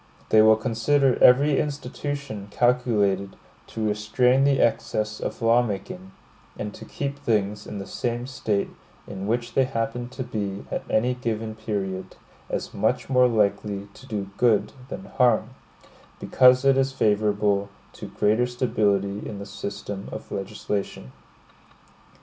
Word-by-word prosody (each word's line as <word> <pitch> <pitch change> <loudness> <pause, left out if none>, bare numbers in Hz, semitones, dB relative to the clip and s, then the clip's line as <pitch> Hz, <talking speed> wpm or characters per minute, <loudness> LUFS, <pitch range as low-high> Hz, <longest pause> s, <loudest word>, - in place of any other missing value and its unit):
They 110 - +6
will 110 0 +7
consider 125 +4 +1
every 140 +3 +6
institution 140 -6 -4
calculated 105 -5 +1 0.3
to 110 -1 -3
restrain 125 +6 +2
the 140 -1 +3
excess 110 -2 0
of - - -5
law 115 +2 +5
making, 95 -4 -5 0.5
and 105 -1 -5
to - - -10
keep 140 0 -4
things 105 -4 -1
in 105 - -6
the 100 - -5
same 120 +2 -3
state 110 -6 -1 0.4
in 95 +1 -6
which 120 +2 -1
they 135 - +3
happen 120 0 -3
to 130 +1 -5
be 100 -5 -4
at - - -2
any 125 +3 +2
given 115 -3 -3
period, 100 -4 -4 0.3
as - - -4
much - - 0
more 125 -1 +5
likely 105 -2 0
to 130 - -15
do 100 -5 -4
good 115 -4 +2 0.2
than 190 - -7
harm; 120 - +2 0.7
because 125 +1 +5
it 135 -1 +5
is 135 0 +1
favorable 105 -3 +1 0.2
to - - -8
greater 110 +4 +1
stability 105 -5 0
in 105 - -6
the 100 - -7
system 100 0 -6
of - - -8
legislation. 100 - -4
110 Hz, 140 wpm, -25 LUFS, 100-125 Hz, 0.7 s, will